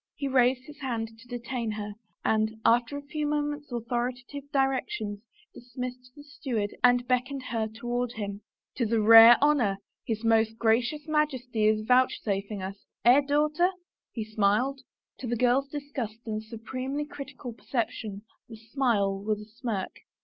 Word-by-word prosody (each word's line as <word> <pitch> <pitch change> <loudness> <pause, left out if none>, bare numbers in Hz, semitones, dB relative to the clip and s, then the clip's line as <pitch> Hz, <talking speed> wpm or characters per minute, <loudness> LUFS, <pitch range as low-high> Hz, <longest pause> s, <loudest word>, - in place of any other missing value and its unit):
He 285 -2 -3
raised 255 -1 +3
his 300 +1 -13
hand 230 -5 -3
to' 245 - -16
detain 245 -1 -4
her 210 -1 -5 0.3
and, 220 0 +1
aftei 240 +3 +3
a 285 0 -5
few 300 0 -2
moment's 295 -1 -2
authoritative 245 +4 -4
directions, 260 -6 -1 0.3
dismissed 250 +1 -7
the 290 - -12
steward 245 -8 -3
and 245 0 +4
beckoned 255 +2 0
her 225 -2 0
toward 240 +2 -3
him. 200 -1 -5 0.2
" - - -64
'Tis 230 -4 -1
a 225 - +4
rare 225 +2 +10
honor 270 -10 +3 0.3
his 225 -2 -3
Most 225 0 +3
Gracious 240 +7 +1
Majesty 260 -8 +1
is 215 0 +2
vouchsafing 210 -5 +1
us 195 +1 -7
— - - -43
eh, 250 +4 +7
daughter? 300 +5 +2 0.2
" - - -66
he 220 -3 -4
smiled. 220 +6 +1 0.4
To 255 - -5
the 240 0 -1
girl's 250 +3 +3
disgusted 275 -6 -6
and 215 -1 -3
supremely 255 +6 -4
critical 275 -4 -8
percep 235 +1 -2
tion 205 -2 -7 0.3
the 225 - -8
smile 220 -4 0
was 210 +1 -1
a 210 - -9
smirk. 220 -3 -4
240 Hz, 160 wpm, -28 LUFS, 220-270 Hz, 0.4 s, rare